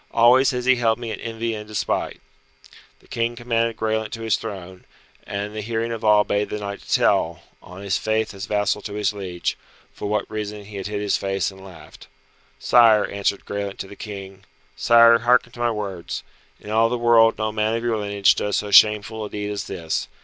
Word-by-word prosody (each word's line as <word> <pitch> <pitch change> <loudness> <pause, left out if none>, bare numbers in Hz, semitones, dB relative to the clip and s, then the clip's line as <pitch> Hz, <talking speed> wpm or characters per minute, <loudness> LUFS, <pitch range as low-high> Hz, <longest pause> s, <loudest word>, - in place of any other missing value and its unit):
Always 125 +3 +5
has 125 -1 -3
he 130 0 +4
held 115 -2 +2
me 120 -2 -6
in - - -6
envy 115 0 -3
and 105 -1 -7
despite." 105 -1 -2 0.8
The - - -24
King 115 +1 -2
commanded 115 -1 -1
Graelent 110 -1 -1
to 115 -1 -6
his 110 -2 +2
throne, 95 -4 -8 0.4
and 100 0 -3
in 105 +1 -7
the 110 - -4
hearing 115 +2 -2
of 115 -1 -5
all 105 -1 +5
bade 105 0 -1
the 105 - -3
knight 100 -1 -6
to - - -17
tell, 85 +1 +2 0.2
on 90 +2 -12
his 100 -1 0
faith 110 0 -1
as 100 +2 -7
vassal 105 0 0
to 100 - -7
his 105 0 0
liege, 90 -4 -4 0.3
for 100 - -5
what 105 0 0
reason 105 -1 -6
he 105 0 -9
had 95 - -4
hid 105 0 -4
his 105 -1 +1
face 95 0 -2
and 95 0 -14
laughed. 80 -5 -14 0.5
"Sire," 110 - +5
answered 100 0 -2
Graelent 100 -1 -4
to - - -6
the 100 - -11
King, 95 -2 -9 0.3
"Sire, 115 +9 +6
hearken 120 0 +3
to 120 - -14
my 120 0 +1
words. 100 -6 -5 0.4
In 105 - -9
all 115 +1 +3
the 125 - -1
world 115 -1 +4
no 110 0 -1
man 110 +1 0
of 115 - -3
your 115 -2 0
lineage 100 -1 +2
does 105 -1 -2
so 105 -1 -2
shameful 105 +2 +5
a - - -7
deed 105 0 -4
as 105 - -4
this. 80 -2 -3
105 Hz, 215 wpm, -22 LUFS, 100-115 Hz, 0.8 s, Sire